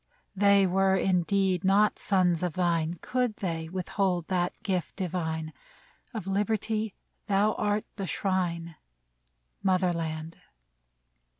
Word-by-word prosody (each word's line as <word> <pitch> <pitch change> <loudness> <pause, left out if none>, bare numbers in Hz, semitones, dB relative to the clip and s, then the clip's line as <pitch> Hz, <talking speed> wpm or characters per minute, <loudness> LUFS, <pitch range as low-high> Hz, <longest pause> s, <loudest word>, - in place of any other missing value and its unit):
They 200 0 +5
were 190 +1 +3
indeed 190 0 +1
not 200 +2 +3
sons 180 -4 +2
of 180 -3 -1
thine 170 -2 +1
Could 250 -4 0
they 165 -5 -3
withhold 185 -1 -1
that 180 -1 +1
gift 185 -4 -2
divine; 160 -4 -3 0.6
Of 220 -7 -5
liberty 215 +2 -1 0.3
thou 205 +2 +3
art 210 0 0
the 195 -2 -3
shrine, 170 -4 -1 0.8
Mother 185 -2 +2
land 160 -1 -4
185 Hz, 110 wpm, -28 LUFS, 170-200 Hz, 0.8 s, They